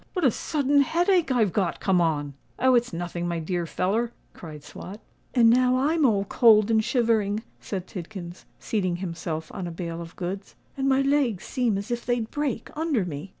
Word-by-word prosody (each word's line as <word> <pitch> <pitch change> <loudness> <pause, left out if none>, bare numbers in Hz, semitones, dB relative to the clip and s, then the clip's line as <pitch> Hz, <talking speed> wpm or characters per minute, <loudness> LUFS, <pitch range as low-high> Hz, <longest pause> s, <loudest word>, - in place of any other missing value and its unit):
what 360 -5 0
a 255 - +5
sudden 285 +2 +1
headache 345 +1 +2
I've 220 -7 +2
got 185 -5 0
come 185 -3 +2
on!" 145 -4 0 0.2
"Oh! 260 0 +4
it's 240 0 +2
nothing, 175 0 -4
my 170 -1 -1
dear 170 +1 -2
feller," 220 +8 0 0.2
cried 155 -3 -10
Swot. 180 +7 -9 0.4
"And 235 -2 +6
now 250 +2 +4
I'm 300 +2 +3
all 200 -4 +1
cold 220 -2 +5
and 220 -1 +3
shivering," 220 -3 +1 0.2
said 190 -3 -5
Tidkins, 180 -1 -8
seating 185 -5 -1
himself 165 -3 -5
on 190 -3 -4
a - - -5
bale 170 0 -5
of 165 0 -10
goods; 190 +2 -5 0.2
"and 275 0 0
my 270 0 +3
legs 275 -8 +1
seem 240 -6 0
as 200 +4 -5
if 240 0 -2
they'd 240 -2 -1
break 285 -6 -3
under 300 - 0
me." 155 +2 -6
210 Hz, 190 wpm, -25 LUFS, 175-255 Hz, 0.4 s, And